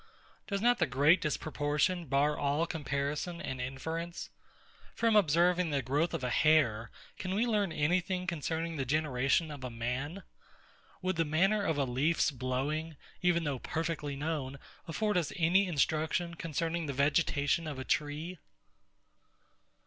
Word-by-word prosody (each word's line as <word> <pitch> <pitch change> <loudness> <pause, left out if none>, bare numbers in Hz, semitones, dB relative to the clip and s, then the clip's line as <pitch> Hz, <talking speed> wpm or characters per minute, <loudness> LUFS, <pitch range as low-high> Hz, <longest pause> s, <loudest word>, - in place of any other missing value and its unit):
Does 200 -1 -2
not 245 +1 +3
the 175 - +3
great 145 +7 +4
disproportion 150 +3 0
bar 140 +3 +2
all 145 +3 +1
comparison 150 +2 -3
and 130 -5 -4
inference? 160 +7 -5 0.6
From 230 -1 +2
observing 175 -1 +4
the 140 -3 0
growth 150 +6 0
of 150 - -4
a 125 - -1
hair, 135 -8 +3 0.3
can 185 0 -2
we 225 +4 +2
learn 210 -6 +1
any 160 +4 +2
thing 180 0 -3
concerning 165 -1 -2
the 135 - 0
generation 150 +2 +1
of 145 -3 -8
a 125 - -3
man? 125 +10 -4 0.8
Would 185 -2 0
the 165 - +3
manner 190 +7 +2
of 160 -5 0
a 140 - +2
leaf's 140 +6 +1
blowing, 140 +5 -2 0.2
even 175 -1 +2
though 140 -4 -2
perfectly 160 -2 -3
known, 140 -2 -3 0.3
afford 205 +5 0
us 170 -4 0
any 180 +4 +3
instruction 160 +2 0
concerning 165 0 -2
the 140 - -2
vegetation 145 +3 +1
of 145 -3 -5
a 130 - -5
tree? 155 +4 -2
155 Hz, 150 wpm, -31 LUFS, 140-170 Hz, 0.8 s, great